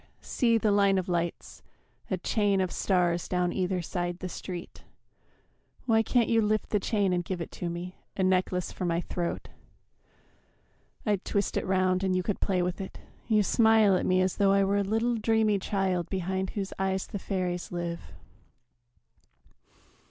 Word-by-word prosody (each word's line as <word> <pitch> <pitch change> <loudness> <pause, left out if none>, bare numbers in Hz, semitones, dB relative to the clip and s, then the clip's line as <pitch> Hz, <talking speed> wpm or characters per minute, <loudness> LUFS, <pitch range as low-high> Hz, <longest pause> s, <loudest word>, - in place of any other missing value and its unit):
See 230 -2 +2
the 215 -1 +2
line 200 -1 +4
of 185 - -1
lights, 175 -1 -3 0.5
A 190 - 0
chain 200 +1 +1
of 185 -2 0
stars 175 -3 +1
down 180 -1 0
either 180 -1 -1
side 175 0 -3
the 185 0 -5
street 175 0 -7 1.0
Why 225 -3 +4
can't 235 +1 +2
you 230 -1 +3
lift 215 0 0
the 210 - +2
chain 200 -2 +1
and 175 -1 0
give 180 +1 -4
it 170 - -6
to 175 - -4
me, 175 +2 -6 0.2
A 190 - +1
necklace 185 -1 +1
for - - -6
my 170 -1 0
throat? 175 -1 -4 1.6
I'd 205 -4 0
twist 200 -1 -1
it - - -1
round 185 0 +2
And 190 -1 +1
you 185 - 0
could 205 - -2
play 185 -2 +1
with 180 +2 -2
it. 190 - -7 0.3
You 215 -2 +3
smile 220 -2 +4
at - - 0
me 185 0 +3
As 185 - -1
though 195 -1 +4
I 195 0 +4
were 200 +1 +1
a - - +2
little 225 +4 0
dreamy 220 -2 +2
child 190 -3 -1
Behind 190 0 -2
whose 195 -2 -4
eyes 190 0 0
the 205 - -6
fairies 180 -2 -3
live. 170 -1 -3
190 Hz, 175 wpm, -28 LUFS, 180-205 Hz, 1.6 s, line